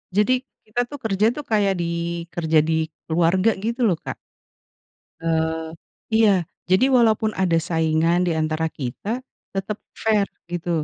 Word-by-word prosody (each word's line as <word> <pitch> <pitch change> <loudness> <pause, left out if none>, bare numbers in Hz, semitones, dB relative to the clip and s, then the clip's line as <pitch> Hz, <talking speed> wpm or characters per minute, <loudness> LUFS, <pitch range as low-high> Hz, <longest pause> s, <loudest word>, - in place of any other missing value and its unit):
Jadi 210 +5 +4 0.3
kita 240 +3 -1
tuh 290 - -7
kerja 210 -1 +1
tuh 295 - -5
kayak 200 -2 +3
di 170 0 -2
kerja 160 -2 +3
di 160 0 0 0.2
keluarga 175 +6 +3
gitu 230 +4 -2
loh, 175 - +2
Kak. - - -6 1.0
Eee, 160 0 0 0.5
iya 220 -2 +6 0.4
jadi 190 +8 +5
walaupun 220 -2 +3
ada 170 -3 +3
saingan 165 +1 +2
di - - +2
antara 155 +1 0
kita 130 - -4 0.4
tetep 195 +2 -3 0.3
fair 215 -2 +3 0.2
gitu, 175 0 -4
175 Hz, 140 wpm, -23 LUFS, 160-215 Hz, 1.0 s, iya